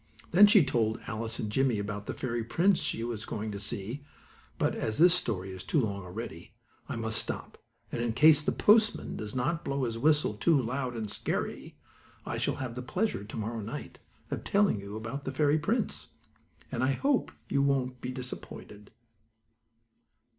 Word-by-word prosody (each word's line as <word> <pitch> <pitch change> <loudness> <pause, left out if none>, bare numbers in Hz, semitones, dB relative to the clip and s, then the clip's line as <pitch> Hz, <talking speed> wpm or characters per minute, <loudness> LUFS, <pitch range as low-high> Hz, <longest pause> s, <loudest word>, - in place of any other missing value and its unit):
Then 200 +5 +9
she 205 -6 +6
told 110 -4 +1
Alice 110 0 -3
and 105 - -3
Jimmie 130 -1 +2
about 105 0 -4
the - - -3
fairy 120 -2 -2
prince 175 - +3
she 115 - -2
was 115 -3 -4
going 110 0 -4
to 100 - -5
see, 110 +6 -5 0.5
but, - - +1
as 110 -1 -2
this 175 +1 +7
story 100 - -1
is 95 -1 -8
too 155 - +1
long 100 -5 -1
already, 90 +1 -8 0.3
I 140 - -2
must 115 -1 -1
stop, - - -5 0.3
and 120 - -2
in 120 -1 0
case 150 +4 +7
the - - 0
postman 215 +1 +3
does 105 +1 -5
not 150 +7 0
blow 140 -1 -1
his 115 -2 -2
whistle 150 -3 +3
too 150 +8 +3
loud 125 0 -2
and 110 -2 -3
scary, - - -3 0.5
I - - -3
shall - - 0
have 130 -3 -4
the 125 - -5
pleasure, 180 - -1
to 105 - -8
morrow 110 +1 -3
night, 105 +2 -7 0.3
of - - -3
telling 200 - +3
you 100 +1 -7
about 115 +6 -5
the 135 - -3
fairy 150 +2 +3
prince. 215 +8 -1 0.6
And 120 - -1
I 135 +1 +3
hope 275 - +1 0.2
you 140 - +1
won't 130 -3 0
be 125 - -4
disappointed. 125 -5 -8
120 Hz, 180 wpm, -30 LUFS, 110-145 Hz, 0.6 s, Then